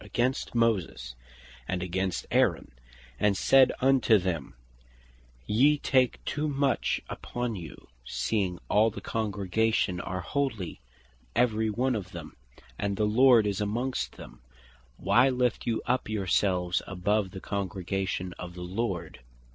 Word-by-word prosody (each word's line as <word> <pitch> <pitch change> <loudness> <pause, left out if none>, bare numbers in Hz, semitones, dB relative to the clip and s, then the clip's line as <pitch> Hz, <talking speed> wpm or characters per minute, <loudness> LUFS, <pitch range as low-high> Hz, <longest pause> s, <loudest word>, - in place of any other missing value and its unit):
3) - - -12
"against 125 +1 -1
Moses, 95 - 0 0.5
and 90 -1 -2
against 95 -1 -2
Aaron, - - +2 0.5
and 100 -2 +2
said 135 -1 +5
unto 130 -4 +5
them, 90 -6 -3 0.9
'Ye 135 +8 +4
take 130 -3 +1
too 150 +2 -1
much 140 -1 0
upon 120 -2 -4
you, 85 -4 -10 0.2
seeing 90 - -1
all 110 +2 +4
the 110 - -8
congregation 105 -2 0
are 95 0 -4
Holy, 110 - -3 0.5
every 110 -2 +2
one 125 +5 0
of 100 -5 -5
them, 80 -3 -8 0.4
and 100 -1 -1
the 105 - +2
Lord 120 +1 +5
is 100 -1 -1
amongst 120 +6 -2
them, - - -12 0.6
why 125 +3 +4
lift 125 -3 0
you 115 -1 0
up 125 -2 0
your 105 -3 -2
selves 90 -2 +1
above 100 +2 0
the 95 - -8
congregation 95 -1 -3
of 90 -1 -7
the 90 - -7
Lord? 90 -3 -3
105 Hz, 135 wpm, -28 LUFS, 90-120 Hz, 0.9 s, said